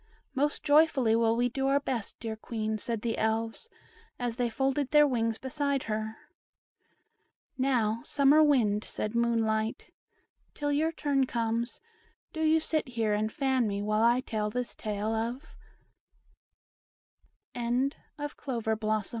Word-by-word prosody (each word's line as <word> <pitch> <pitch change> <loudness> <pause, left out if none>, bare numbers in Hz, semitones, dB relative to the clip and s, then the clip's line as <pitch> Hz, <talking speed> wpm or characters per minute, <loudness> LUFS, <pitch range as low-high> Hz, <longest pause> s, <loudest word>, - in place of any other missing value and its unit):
"Most 290 +2 0
joyfully 290 -6 +4
will 230 0 +3
we 245 +1 +2
do 270 +2 -1
our 275 +1 +3
best, 250 -6 -4
dear 225 -2 -4
Queen," 220 -1 -3
said 230 0 -3
the 230 -1 -1
Elves, 225 - -1 0.5
as 240 -1 -3
they 245 -2 +1
folded 270 +3 0
their 295 0 +6
wings 230 -5 0
beside 280 +1 -1
her. 220 0 -3 1.4
"Now, 235 -4 +1
Summer 285 +2 +4
Wind," 230 -9 +3
said 215 - -4
Moonlight, 225 -2 0 0.6
"till 290 -1 -1
your 310 +3 +1
turn 280 -4 0
comes, 230 0 -2 0.5
do 320 - -4
you 315 0 +4
sit 315 -1 -1
here 225 -4 0
and 215 +1 0
fan 265 -3 +1
me 200 0 -2
while 215 +1 +1
I 240 +2 +4
tell 215 -4 -2
this 250 +2 -3
tale 215 0 -3
of 225 +2 -1 2.2
LITTLE 245 +3 0 0.3
ANNIE'S 290 0 -4
DREAM; 255 -5 -4 0.2
OR 215 0 +1
235 Hz, 140 wpm, -29 LUFS, 220-275 Hz, 2.2 s, their